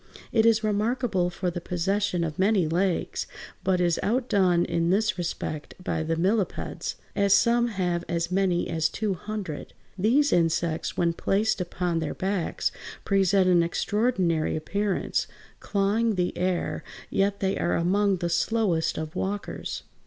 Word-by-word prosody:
It 225 -1 +4
is 220 -1 +4
remarkable 215 -3 +1
for 180 0 -2
the 175 0 -5
possession 185 +1 0
of 160 -1 -4
many 195 -3 +3
legs, 175 +2 0 0.4
but 185 -1 +2
is 175 -2 +2
outdone 200 -7 +2
in 170 0 0
this 200 +2 +2
respect 155 -4 -4
by 180 -3 -2
the 160 +1 -1
millipeds, 195 +4 -1 0.2
as 200 -1 +4
some 235 +3 +3
(Fig. 225 - -6
164) 185 - +1
have 175 -1 -1
as 170 +1 -2
many 185 -2 +1
as 160 -1 0
two 210 -2 -1
hundred. 190 -4 -6 0.3
These 265 +9 +3
insects, 165 -1 0
when 170 -1 +2
placed 205 +4 +1
upon 175 -1 -1
their 160 -2 -3
backs, 190 -2 -1 0.3
present 195 -1 +3
an 175 -2 +5
extraordinary 180 -2 0
appearance, 200 +5 -1 0.3
clawing 210 +2 +1
the 180 -1 -1
air; 180 -1 -1 0.3
yet 200 +1 +1
they 195 0 0
are 175 - +1
among 195 +3 +2
the 175 -1 -2
slowest 170 -1 +1
of 155 +2 -5
walkers. 200 +2 -4
185 Hz, 150 wpm, -26 LUFS, 170-205 Hz, 0.4 s, an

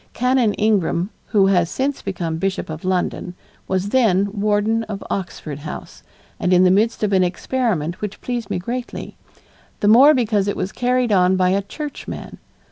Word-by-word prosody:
Canon 250 -3 +2
Ingram, 200 -3 +1 0.2
who 200 -3 +3
has 180 -4 +3
since 275 +1 -2
become 170 -4 -3
Bishop 190 -2 -2
of 155 0 -7
London, 180 -1 -2 0.3
was 190 +1 -1
then 200 -5 +3
warden 210 +2 +1
of 205 -2 -6
Oxford 160 -6 -4
House 150 - -8 0.4
and 180 - 0
in 180 0 +5
the 180 - +5
midst 215 +4 +1
of 205 -1 +1
an 190 -1 +4
experiment 180 - -1
which 210 -1 -5
pleased 240 -2 -4
me - - -1
greatly, 240 +7 -5 0.6
the 205 - +1
more 265 +8 +7
because 215 -5 +1
it 205 - -1
was 190 - -2
carried 250 -1 0
on 185 -1 +4
by 185 -1 +2
a 195 +2 +2
churchman. 290 +9 -7
200 Hz, 170 wpm, -20 LUFS, 185-230 Hz, 0.6 s, more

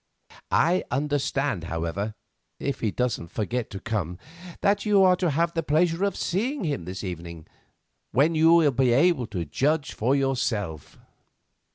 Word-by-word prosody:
I 175 +3 +3
understand, 140 - -1
however—if 100 - -5
he 110 - 0
doesn't 120 -6 -2
forget 115 +6 -3
to 95 - -7
come—that 155 - -3
you 205 -2 +4
are 185 -1 +6
to 180 -2 +1
have 165 +3 0
the 165 - 0
pleasure 165 +4 +1
of 200 - -2
seeing 235 - -1
him 145 - -2
this 95 +3 -6
evening, 85 -3 -7 0.7
when 145 +6 +3
you 160 +1 +5
will 165 -4 +5
be 125 -1 +2
able 140 -2 +3
to 90 -6 -4
judge 140 - 0
for 125 +5 +1
yourself." 120 - -2
135 Hz, 145 wpm, -25 LUFS, 100-165 Hz, 0.7 s, are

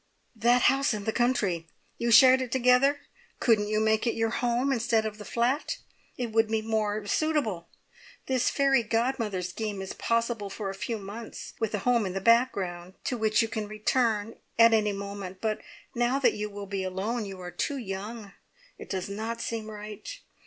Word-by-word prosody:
"That 240 +2 +3
house 270 -4 +3
in 205 - -5
the 220 - 0
country! 200 -9 +1 0.3
You 235 - 0
shared 260 +2 +8
it 250 -2 -4
together? 260 +3 +4 0.4
Couldn't 215 -3 +3
you 215 0 +1
make 220 +1 +2
it - - +1
your 225 0 0
home 245 +3 +1
instead 230 -2 +1
of 215 0 -5
the - - -7
flat? 250 +5 0 0.4
It 245 -3 -3
would 225 0 +3
be 220 0 -1
more 215 -1 -1
suitable. 220 - 0 0.6
This 260 -2 +1
fairy 275 -2 +3
godmother 225 -4 -1
scheme 205 +3 -4
is 190 0 -5
possible 230 -3 -1
for 195 -1 -4
a - - -7
few 225 +4 -3
months, 210 +3 -8
with 220 -2 -1
a 200 - -5
home 240 -4 +3
in 185 - -4
the 195 - -1
background, 190 -6 +1
to 250 - -1
which 220 -1 +2
you - - -1
can 215 -2 -4
return 215 0 0 0.2
at 230 0 +7
any 210 -2 +3
moment, 200 -2 -6
but 215 0 -1 0.3
now 240 +2 +1
that 275 - +3
you 210 0 -4
will 205 0 -7
be 195 -1 -3
alone, 205 +5 -2
you 195 -2 -8
are 180 -1 -7
too 275 - -2
young. 205 -1 -6 0.5
It - - -10
does 190 -2 -3
not 220 +3 -4
seem 225 -1 -4
right. 210 - -8
220 Hz, 190 wpm, -28 LUFS, 205-240 Hz, 0.6 s, shared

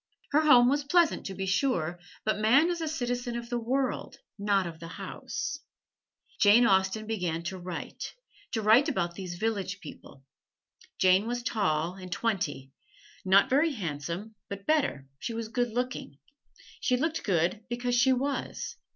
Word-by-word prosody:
Her 295 +2 +4
home 250 -6 +7
was 285 +3 +2
pleasant, 335 +3 +2
to 195 - -6
be 190 +1 -3
sure, 180 - 0 0.3
but 215 -1 +1
man 270 +11 +5
is 340 -1 -3
a 320 - -1
citizen 245 -5 -2
of 235 0 -7
the 240 - 0
world, 260 +2 -1 0.2
not 200 -2 +2
of 165 -1 -8
a 165 - -7
house. 290 - -5 0.8
Jane 215 +4 +6
Austen 190 +2 +2
began 180 -7 -2
to 185 +2 -5
write 175 -1 -6 0.4
to 220 -3 -1
write 235 +9 +6
about 175 - -1
these 180 -1 -6
village 200 -2 -2
people. 140 -4 -12 0.7
Jane 185 +3 +4
was 240 0 -2
tall, 175 -8 0
and 185 -1 -10
twenty 180 - -2 0.5
not 195 +4 +5
very 290 +4 +3
handsome, 170 - -4 0.2
but 200 0 -7
better, 275 - +1
she 230 - -4
was 225 -1 -4
good 245 +1 0
looking. 245 - -3 0.6
She 250 - +1
looked 320 +4 -1
good 185 +2 +1
because 245 +1 -1
she 245 +2 +4
was. 275 +2 -2
220 Hz, 160 wpm, -29 LUFS, 185-250 Hz, 0.8 s, home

